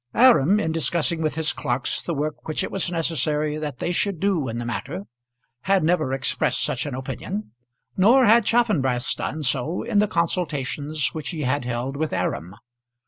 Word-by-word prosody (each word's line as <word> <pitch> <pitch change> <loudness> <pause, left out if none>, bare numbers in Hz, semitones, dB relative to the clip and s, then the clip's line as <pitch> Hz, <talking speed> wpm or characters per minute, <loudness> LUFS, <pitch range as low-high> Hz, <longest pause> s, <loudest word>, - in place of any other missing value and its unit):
Aram, 210 - +6
in 160 -5 0
discussing 165 0 +1
with 155 -1 -1
his 160 0 0
clerks 125 +3 -1
the 170 - -3
work 150 +1 -3
which 155 - -1
it - - -4
was 195 -2 -1
necessary 155 -3 -1
that 150 -4 -4
they 170 - -2
should 185 0 0
do 185 -8 +1
in 115 0 -4
the 120 - -4
matter, 110 -4 -4 0.6
had 195 -2 +3
never 155 -4 +1
expressed 135 -1 0
such 125 +3 -1
an 140 - -4
opinion; 135 - -5 0.4
nor 240 +7 +5
had 230 +1 +6
Chaffanbrass 155 - +2
done 155 0 -4
so 140 +6 0
in 205 - +1
the 210 - +3
consultations 155 -4 -1
which 155 -2 -5
he 160 -3 -4
had 130 0 0
held 125 +3 -3
with 155 +1 -2
Aram. 85 +7 -2
155 Hz, 180 wpm, -23 LUFS, 135-180 Hz, 0.6 s, Aram